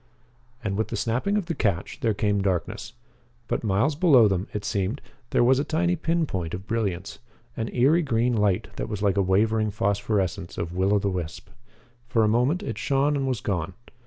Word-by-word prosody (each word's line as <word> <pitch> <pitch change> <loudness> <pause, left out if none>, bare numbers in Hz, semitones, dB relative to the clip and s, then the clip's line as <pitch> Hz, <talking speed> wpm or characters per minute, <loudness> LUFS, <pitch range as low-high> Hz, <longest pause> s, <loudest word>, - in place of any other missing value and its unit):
And, 100 -3 -2
with 110 - 0
the - - -4
snapping 125 - 0
of 205 - -1
the 170 - -2
catch, 100 - -1
there 110 -3 +1
came 105 0 +1
darkness. 95 +3 -2 0.5
But, - - -2
miles 110 +8 +2
below 145 -8 +6
them, 95 -1 -1
it 105 -1 -4
seemed, 100 +6 -1 0.3
there - - +3
was 130 +2 +4
a - - +1
tiny 175 +3 +1
pin 165 0 0
point 90 - -3
of 95 +2 -8
brilliance 100 -5 -2 0.4
an 115 - -2
eery 140 +8 +4
green 120 -3 +1
light 105 -4 +1
that - - -3
was 105 -1 -4
like 100 -2 +2
a - - +4
wavering 110 +3 +2
phosphorescence 100 -3 -1
of 85 0 -3
will 95 +3 +2
o' - - +5
the 100 -1 0
wisp. 85 -3 -5 0.6
For 120 -3 +2
a - - +4
moment 125 - +2
it - - -4
shone 140 +1 +1
and 135 -1 -1
was 125 -5 -1
gone. 90 -2 -2
110 Hz, 200 wpm, -25 LUFS, 95-135 Hz, 0.6 s, below